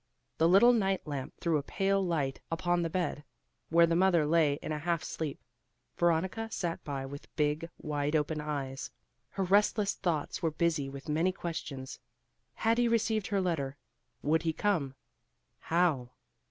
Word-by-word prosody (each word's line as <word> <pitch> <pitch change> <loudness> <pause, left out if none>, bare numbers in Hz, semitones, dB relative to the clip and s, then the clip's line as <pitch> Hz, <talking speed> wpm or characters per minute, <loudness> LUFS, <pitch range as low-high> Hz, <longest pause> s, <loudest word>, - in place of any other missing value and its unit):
The 165 +1 +5
little 235 +7 +7
night 195 -4 +1
lamp 140 -4 -5
threw 165 -3 +1
a - - -3
pale 195 +6 0
light 150 -7 -1
upon 175 +1 +1
the 165 - -1
bed, 170 -3 -2 0.5
where 170 +1 +6
the 165 0 +1
mother 175 -3 +4
lay 155 -2 +3
in - - -5
a 150 - -2
half 165 -1 -1
sleep. 155 -3 -4 0.6
Veronica 180 +6 +1
sat 175 -6 -3
by 140 -2 -4
with 140 +1 -9
big 150 +2 0
wide 150 0 -2
open 155 0 0
eyes. 140 -3 -4 0.4
Her 195 - -2
restless 205 +2 +3
thoughts 165 -6 -2
were 165 - +2
busy 155 -3 0
with 140 0 -9
many 160 +5 +2
questions. 155 -7 -6 0.6
Had 230 +1 +2
he 240 - +4
received 220 -2 +1
her 200 -2 +1
letter? 145 -7 -1 0.5
Would 155 +2 +2
he 160 -1 0
come? 155 -9 0 0.6
How? 160 -8 +1
165 Hz, 160 wpm, -31 LUFS, 150-185 Hz, 0.6 s, little